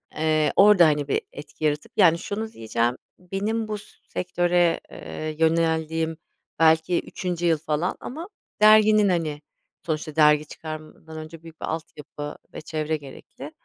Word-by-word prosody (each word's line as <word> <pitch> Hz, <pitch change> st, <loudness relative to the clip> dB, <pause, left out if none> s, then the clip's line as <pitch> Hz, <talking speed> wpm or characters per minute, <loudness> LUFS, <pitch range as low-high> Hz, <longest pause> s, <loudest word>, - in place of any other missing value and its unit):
Eee, 155 Hz, 0 st, +2 dB
orada 200 Hz, -3 st, +7 dB
hani 150 Hz, -2 st, +1 dB
bir 140 Hz, -, 0 dB
etki 150 Hz, +1 st, -7 dB
yaratıp 150 Hz, 0 st, -1 dB
yani, 170 Hz, -4 st, +6 dB
şunu 220 Hz, +4 st, -4 dB
diyeceğim, 115 Hz, +2 st, -1 dB, 0.2 s
benim 205 Hz, +5 st, -2 dB
bu 215 Hz, -, -3 dB, 0.3 s
sektöre, 175 Hz, -1 st, +1 dB
eee, 155 Hz, 0 st, -6 dB
yöneldiğim 160 Hz, 0 st, +1 dB, 0.4 s
belki 160 Hz, +2 st, +4 dB
3. 175 Hz, -2 st, -4 dB
yıl 165 Hz, -2 st, +3 dB
falan, 155 Hz, +3 st, -2 dB
ama 325 Hz, +9 st, -7 dB, 0.3 s
derginin, 215 Hz, -1 st, +6 dB
hani, 155 Hz, -4 st, -1 dB, 0.4 s
sonuçta, 155 Hz, -1 st, -3 dB
dergi 150 Hz, -1 st, +5 dB
çıkarmadan 155 Hz, +1 st, -9 dB
önce, 155 Hz, +1 st, -9 dB
büyük 165 Hz, -1 st, -14 dB
bir -, -, -2 dB
altyapı 150 Hz, -2 st, -6 dB, 0.2 s
ve -, -, -7 dB
çevre 155 Hz, 0 st, -2 dB
gerekli. 140 Hz, -3 st, -11 dB
160 Hz, 135 wpm, -24 LUFS, 155-180 Hz, 0.4 s, orada